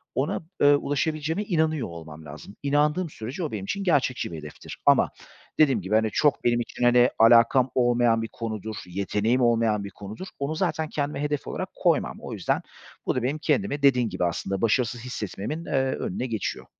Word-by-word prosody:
ona, 135 Hz, +5 st, -1 dB, 0.2 s
ııı, 145 Hz, 0 st, +6 dB
ulaşabileceğime 155 Hz, +5 st, -1 dB
inanıyor 160 Hz, -, 0 dB
olmam 80 Hz, -2 st, -10 dB
lazım. 75 Hz, +7 st, -10 dB
İnandığım 150 Hz, +4 st, +1 dB
sürece 125 Hz, +8 st, -6 dB
o 155 Hz, -, -3 dB
benim 105 Hz, -3 st, -4 dB
için 200 Hz, -, -3 dB
gerçekçi 135 Hz, -, +1 dB
bir 80 Hz, -, -6 dB
hedeftir 75 Hz, -1 st, -9 dB
ama -, -, +5 dB, 0.5 s
dediğim 135 Hz, -8 st, +4 dB
gibi, 95 Hz, +4 st, -1 dB
hani, 110 Hz, -1 st, +2 dB
çok 145 Hz, +1 st, +2 dB
benim 120 Hz, 0 st, +2 dB
için, 120 Hz, -, -4 dB
hani, 120 Hz, +1 st, +5 dB
alakam 115 Hz, +3 st, +6 dB
olmayan 120 Hz, -2 st, +3 dB
bir 115 Hz, -, -3 dB
konudur, 110 Hz, -1 st, -5 dB
yeteneğim 105 Hz, +6 st, 0 dB
olmayan 115 Hz, -3 st, +2 dB
bir 100 Hz, -, -6 dB
konudur. 105 Hz, -, -9 dB
Onu 140 Hz, +3 st, -2 dB
zaten 160 Hz, -3 st, -1 dB
kendime 145 Hz, -1 st, -2 dB
hedef 145 Hz, -1 st, -2 dB
olarak -, -, -4 dB
koymam. -, -, +1 dB
O -, -, -7 dB
yüzden -, -, -1 dB, 0.4 s
bu -, -, 0 dB
da 125 Hz, -, -1 dB
benim 140 Hz, +5 st, 0 dB
kendimi 155 Hz, -2 st, 0 dB
dediğim 125 Hz, -5 st, +4 dB
gibi 90 Hz, -1 st, -1 dB
aslında 95 Hz, +3 st, -2 dB
başarısız 120 Hz, +1 st, +1 dB
hissetmemin, 125 Hz, -, -5 dB
eee, -, -, -7 dB, 0.2 s
önüne 110 Hz, -, -3 dB
geçiyor. 110 Hz, -3 st, -3 dB
120 Hz, 180 wpm, -25 LUFS, 110-145 Hz, 0.5 s, ııı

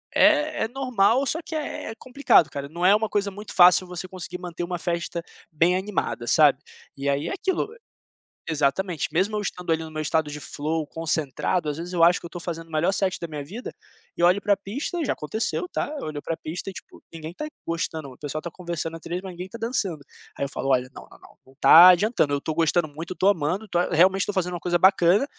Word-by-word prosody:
é 305 Hz, 0 st, +4 dB
é 220 Hz, -, 0 dB
normal, 255 Hz, -1 st, +2 dB
só 325 Hz, -, -1 dB
que -, -, -8 dB
é 295 Hz, -6 st, -4 dB
complicado, 255 Hz, -, +3 dB
cara, 140 Hz, 0 st, -5 dB
não 170 Hz, +3 st, -6 dB
é 200 Hz, +2 st, +7 dB
uma 220 Hz, 0 st, 0 dB
coisa 200 Hz, -1 st, 0 dB
muito 205 Hz, +2 st, -9 dB
fácil 180 Hz, +1 st, +6 dB
você 180 Hz, +1 st, -6 dB
conseguir 180 Hz, -1 st, -7 dB
manter 175 Hz, -1 st, -6 dB
uma 175 Hz, 0 st, -4 dB
festa 170 Hz, -1 st, -3 dB, 0.3 s
bem 170 Hz, +4 st, +3 dB
animada, 190 Hz, -10 st, -3 dB
sabe. 145 Hz, +1 st, +5 dB, 0.4 s
E 140 Hz, 0 st, -4 dB
aí 140 Hz, +1 st, 0 dB
é -, -, -3 dB
aquilo 380 Hz, 0 st, -1 dB, 0.8 s
exatamente, 160 Hz, +3 st, 0 dB
mesmo 200 Hz, +5 st, +1 dB
eu -, -, -1 dB
estando 180 Hz, -4 st, -4 dB
ali 160 Hz, 0 st, +1 dB
no 160 Hz, -, -9 dB
meu 155 Hz, 0 st, -4 dB
estado 155 Hz, 0 st, 0 dB
de 150 Hz, -, -6 dB
flow 155 Hz, +2 st, -3 dB
concentrado, 160 Hz, +1 st, -1 dB
às 145 Hz, -, -4 dB
vezes 175 Hz, +2 st, -6 dB
eu 170 Hz, -, +3 dB
acho 175 Hz, +1 st, +5 dB
que -, -, -12 dB
eu -, -, -4 dB
estou 175 Hz, +1 st, -8 dB
fazendo 165 Hz, -1 st, -5 dB
o -, -, -17 dB
melhor 155 Hz, +4 st, +1 dB
set 195 Hz, -1 st, -1 dB
da 170 Hz, -, -5 dB
minha 150 Hz, -3 st, -6 dB
vida 220 Hz, -, -7 dB, 0.5 s
e 170 Hz, -, -1 dB
olho 180 Hz, +3 st, +4 dB
para 205 Hz, 0 st, +2 dB
pista, 260 Hz, -, -4 dB
e 320 Hz, -, -1 dB
já -, -, 0 dB
aconteceu, 175 Hz, 0 st, -3 dB
tá, -, -, -2 dB
eu -, -, -5 dB
olho 150 Hz, -1 st, -4 dB
para 165 Hz, -, -2 dB
pista 170 Hz, +5 st, -6 dB
e, -, -, -15 dB
tipo, -, -, -12 dB
ninguém 160 Hz, 0 st, -7 dB
tá 300 Hz, -, -5 dB, 0.2 s
gostando, 160 Hz, -3 st, -3 dB
o 125 Hz, -, -15 dB
pessoal 150 Hz, +1 st, -4 dB
está 170 Hz, -, -6 dB
conversando 170 Hz, -2 st, -5 dB
atrás, 175 Hz, +2 st, -5 dB
mas 190 Hz, -1 st, -7 dB
ninguém 180 Hz, +1 st, -7 dB
está 230 Hz, +5 st, -10 dB
dançando. 200 Hz, -, -2 dB, 0.3 s
Aí -, -, -3 dB
eu 140 Hz, -, -2 dB
falo: 135 Hz, 0 st, -4 dB
"Olha, 130 Hz, -1 st, +2 dB
não, -, -, -11 dB
não, -, -, -17 dB
não, -, -, -19 dB
não 130 Hz, -, -20 dB
está 165 Hz, +6 st, +9 dB
adiantando, 180 Hz, -4 st, +3 dB
eu 140 Hz, -, +1 dB
estou 155 Hz, +2 st, -4 dB
gostando 165 Hz, 0 st, +2 dB
muito, 160 Hz, +4 st, -7 dB
estou 190 Hz, +2 st, +3 dB
amando, 180 Hz, +4 st, 0 dB
estou 175 Hz, -3 st, 0 dB
realmente 185 Hz, +3 st, +4 dB
estou 205 Hz, -, -3 dB
fazendo 180 Hz, -2 st, -1 dB
uma 175 Hz, -, -4 dB
coisa 175 Hz, 0 st, 0 dB
bacana, 190 Hz, +4 st, +5 dB
175 Hz, 235 wpm, -24 LUFS, 155-195 Hz, 0.8 s, está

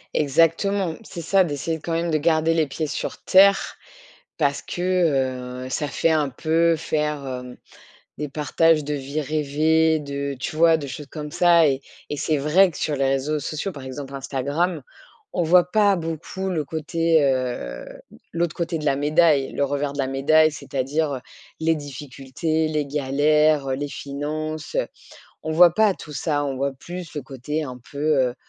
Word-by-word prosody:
Exactement, 165 Hz, +5 st, +2 dB
c'est 175 Hz, -5 st, -8 dB
ça, 190 Hz, +4 st, +3 dB
d'essayer 160 Hz, 0 st, -3 dB
quand 165 Hz, -, -6 dB
même 170 Hz, +1 st, 0 dB
de 155 Hz, -, +2 dB
garder 160 Hz, +1 st, +2 dB
les 160 Hz, -2 st, +3 dB
pieds 150 Hz, +3 st, -4 dB
sur -, -, -4 dB
terre, 195 Hz, +1 st, +4 dB, 0.6 s
parce 140 Hz, -3 st, +1 dB
que, 135 Hz, -9 st, -1 dB
heu, -, -, -7 dB
ça 150 Hz, +3 st, -2 dB
fait 165 Hz, -, +1 dB
un 150 Hz, -2 st, +2 dB
peu 165 Hz, +5 st, +1 dB
faire, 150 Hz, -2 st, -2 dB
hem, 125 Hz, -1 st, -6 dB, 0.6 s
des 150 Hz, +1 st, -4 dB
partages 155 Hz, +2 st, +2 dB
de 150 Hz, +1 st, -2 dB
vie 140 Hz, +2 st, -3 dB
rêvée, 155 Hz, +2 st, +2 dB
de 140 Hz, -1 st, -4 dB
tu 130 Hz, -, -4 dB
vois? 165 Hz, 0 st, +5 dB
De 150 Hz, -3 st, -6 dB
choses 140 Hz, +1 st, -8 dB
comme 150 Hz, -1 st, -7 dB
ça, 170 Hz, -2 st, +5 dB
et 135 Hz, -1 st, 0 dB, 0.3 s
et 150 Hz, -, -2 dB
c'est 155 Hz, +2 st, 0 dB
vrai 160 Hz, +7 st, +4 dB
que 160 Hz, -, -10 dB
sur 150 Hz, -, -1 dB
les 135 Hz, -1 st, 0 dB
réseaux 135 Hz, +3 st, 0 dB
sociaux, 155 Hz, +7 st, -4 dB
par 140 Hz, -5 st, -9 dB
exemple 135 Hz, +1 st, -7 dB
Instagram. 140 Hz, +6 st, -2 dB, 0.5 s
On 175 Hz, -, 0 dB
voit 175 Hz, +2 st, +4 dB
pas 205 Hz, -2 st, +4 dB
beaucoup 165 Hz, +3 st, -4 dB
le 165 Hz, -5 st, -1 dB
côté, 160 Hz, +2 st, +1 dB
heu, 125 Hz, -, -1 dB, 0.5 s
l'autre 170 Hz, -1 st, -1 dB
côté 170 Hz, -1 st, -2 dB
de 150 Hz, -, -5 dB
la 140 Hz, -1 st, +2 dB
médaille, 150 Hz, -1 st, +3 dB
le 140 Hz, -, 0 dB
revers 145 Hz, 0 st, -2 dB
de 145 Hz, -, -9 dB
la 135 Hz, -, +1 dB
médaille. 155 Hz, +4 st, +4 dB
C'est-à-dire, 145 Hz, +2 st, -2 dB
heu:- -, -, -7 dB, 0.4 s
les 165 Hz, 0 st, +2 dB
difficultés, 145 Hz, +2 st, -3 dB
les 150 Hz, -2 st, -1 dB
galères, 145 Hz, +1 st, +2 dB
heu, 130 Hz, -, 0 dB
les 145 Hz, +2 st, -3 dB
finances, 155 Hz, -, -5 dB
heu. -, -, +1 dB, 0.6 s
On 160 Hz, -, -3 dB
voit 170 Hz, +1 st, +6 dB
pas 215 Hz, 0 st, +4 dB
tout 150 Hz, -, -11 dB
ça, 145 Hz, +1 st, -1 dB
on 140 Hz, -2 st, -2 dB
voit 140 Hz, +1 st, -1 dB
plus 175 Hz, +5 st, -9 dB
le 150 Hz, -, -3 dB
côté 140 Hz, +4 st, -4 dB
un 125 Hz, -3 st, -7 dB
peu 140 Hz, -, -9 dB, 0.3 s
heu, 120 Hz, -, -6 dB
150 Hz, 180 wpm, -23 LUFS, 140-165 Hz, 0.6 s, voit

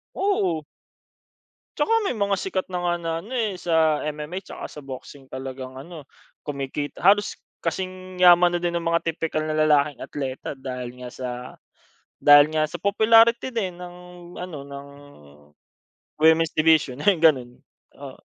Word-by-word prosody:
Oo. 185 Hz, -, 0 dB, 1.1 s
Tsaka -, -, 0 dB, 0.2 s
may -, -, -1 dB
mga 200 Hz, -2 st, 0 dB
sikat 190 Hz, -1 st, -3 dB
na 180 Hz, -, -2 dB
nga 175 Hz, -, +2 dB
na 165 Hz, -, -2 dB
ano, 225 Hz, +9 st, -8 dB
eh, 215 Hz, -6 st, -1 dB
sa 160 Hz, -3 st, +2 dB
MMA 150 Hz, +4 st, -4 dB
tsaka 190 Hz, -, -9 dB
sa -, -, -12 dB
boxing 135 Hz, 0 st, -10 dB
talagang 130 Hz, 0 st, -7 dB
ano, 150 Hz, +1 st, -10 dB, 0.4 s
kumikita, 145 Hz, 0 st, -5 dB
halos 205 Hz, +2 st, +4 dB, 0.2 s
kasing 185 Hz, +2 st, -5 dB
yaman 175 Hz, 0 st, +7 dB
na -, -, -3 dB
din 170 Hz, 0 st, 0 dB
ng 170 Hz, -, -7 dB
mga 170 Hz, 0 st, +2 dB
tipikal 160 Hz, -1 st, -3 dB
na 155 Hz, 0 st, -2 dB
lalaking 150 Hz, -2 st, +3 dB
atleta 135 Hz, 0 st, -5 dB
dahil 125 Hz, -2 st, -7 dB
nga 125 Hz, -, -6 dB
sa 130 Hz, 0 st, -6 dB, 0.9 s
dahil 145 Hz, 0 st, +7 dB
nga 155 Hz, 0 st, +2 dB
sa 170 Hz, +3 st, -8 dB
popularity 225 Hz, +4 st, +4 dB
din 190 Hz, -6 st, -2 dB
ng 180 Hz, 0 st, -9 dB, 0.4 s
ano 180 Hz, -4 st, -6 dB
ng 140 Hz, 0 st, -9 dB, 1.3 s
women's 160 Hz, 0 st, +4 dB
division, 155 Hz, -4 st, +2 dB
eh, 200 Hz, +1 st, +3 dB
ganun. 135 Hz, -7 st, +2 dB, 0.3 s
Oo. -, -, -11 dB
160 Hz, 145 wpm, -24 LUFS, 140-185 Hz, 1.3 s, yaman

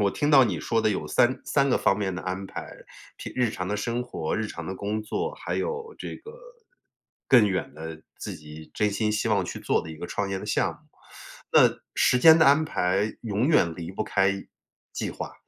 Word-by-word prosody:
我 100 Hz, -1 st, +3 dB
听 145 Hz, +9 st, 0 dB
到 135 Hz, -3 st, +8 dB
你 95 Hz, -8 st, -1 dB
说 115 Hz, +7 st, 0 dB
的 -, -, +2 dB
有 105 Hz, -, -2 dB
3， 130 Hz, +2 st, +2 dB
3 140 Hz, -1 st, +2 dB
个 -, -, +3 dB
方 95 Hz, -, +2 dB
面 95 Hz, -3 st, -2 dB
的 90 Hz, -, -5 dB
安 95 Hz, +1 st, -4 dB
排。 -, -, -8 dB, 0.4 s
平 -, -, -7 dB
日 125 Hz, -3 st, +2 dB
常 90 Hz, -3 st, -4 dB
的 105 Hz, -, -1 dB
生 115 Hz, +3 st, -2 dB
活， 80 Hz, -10 st, -4 dB
日 110 Hz, -, -1 dB
常 85 Hz, -5 st, -7 dB
的 95 Hz, -, -4 dB
工 105 Hz, +3 st, -3 dB
作， 450 Hz, -, -3 dB
还 -, -, -4 dB
有 455 Hz, -1 st, -3 dB
这 -, -, -6 dB
个， 450 Hz, -, -12 dB, 1.0 s
更 120 Hz, -5 st, +7 dB
远 95 Hz, -7 st, -2 dB
的 80 Hz, 0 st, -8 dB, 0.2 s
自 -, -, -5 dB
己 75 Hz, +1 st, -12 dB
真 105 Hz, -, +1 dB
心 105 Hz, +2 st, 0 dB
希 110 Hz, +2 st, 0 dB
望 100 Hz, -4 st, +2 dB
去 -, -, -6 dB
做 -, -, +1 dB
的 80 Hz, -, -8 dB
一 80 Hz, -, -9 dB
个 85 Hz, -, -6 dB
创 100 Hz, -1 st, -3 dB
业 95 Hz, -, -2 dB
的 -, -, -8 dB
项 -, -, +1 dB
目。 -, -, -18 dB, 0.8 s
那 -, -, +7 dB, 0.2 s
时 125 Hz, -, +3 dB
间 160 Hz, +4 st, +8 dB
的 160 Hz, -, +5 dB
安 145 Hz, +3 st, +5 dB
排 95 Hz, -5 st, 0 dB
永 110 Hz, +2 st, -1 dB
远 90 Hz, -, +3 dB
离 85 Hz, +1 st, -6 dB
不 100 Hz, -, -2 dB
开 100 Hz, -2 st, +2 dB, 0.6 s
计 -, -, -4 dB
划 -, -, -7 dB
105 Hz, 235 characters per minute, -26 LUFS, 95-125 Hz, 1.0 s, 到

